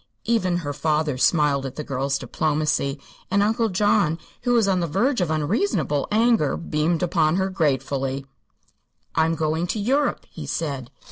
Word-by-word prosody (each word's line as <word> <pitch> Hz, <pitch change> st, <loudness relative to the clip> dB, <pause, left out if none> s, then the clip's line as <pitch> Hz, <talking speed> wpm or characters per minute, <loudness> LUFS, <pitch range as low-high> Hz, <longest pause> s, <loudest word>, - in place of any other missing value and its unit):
Even 185 Hz, -7 st, +1 dB
her 145 Hz, -, -2 dB
father 150 Hz, 0 st, 0 dB
smiled 145 Hz, 0 st, +2 dB
at 135 Hz, -1 st, -6 dB
the 150 Hz, -, -4 dB
girl's 135 Hz, 0 st, -1 dB
diplomacy, 145 Hz, +1 st, -1 dB, 0.3 s
and 200 Hz, +1 st, +3 dB
Uncle 225 Hz, +2 st, +1 dB
John, 200 Hz, -4 st, +2 dB, 0.2 s
who 245 Hz, 0 st, +1 dB
was 230 Hz, -4 st, +3 dB
on 190 Hz, -2 st, +2 dB
the 170 Hz, -, -1 dB
verge 225 Hz, -, +1 dB
of 175 Hz, -, 0 dB
unreasonable 155 Hz, -, 0 dB
anger, 225 Hz, -, +3 dB
beamed 165 Hz, +1 st, 0 dB
upon 165 Hz, -3 st, +2 dB
her 190 Hz, 0 st, 0 dB
gratefully. 135 Hz, -4 st, -1 dB, 0.9 s
"I'm 160 Hz, 0 st, +2 dB
going 160 Hz, +2 st, -1 dB
to 195 Hz, +5 st, -2 dB
Europe," 275 Hz, +7 st, 0 dB
he -, -, -9 dB
said. 140 Hz, -6 st, -3 dB
160 Hz, 155 wpm, -23 LUFS, 145-200 Hz, 0.9 s, and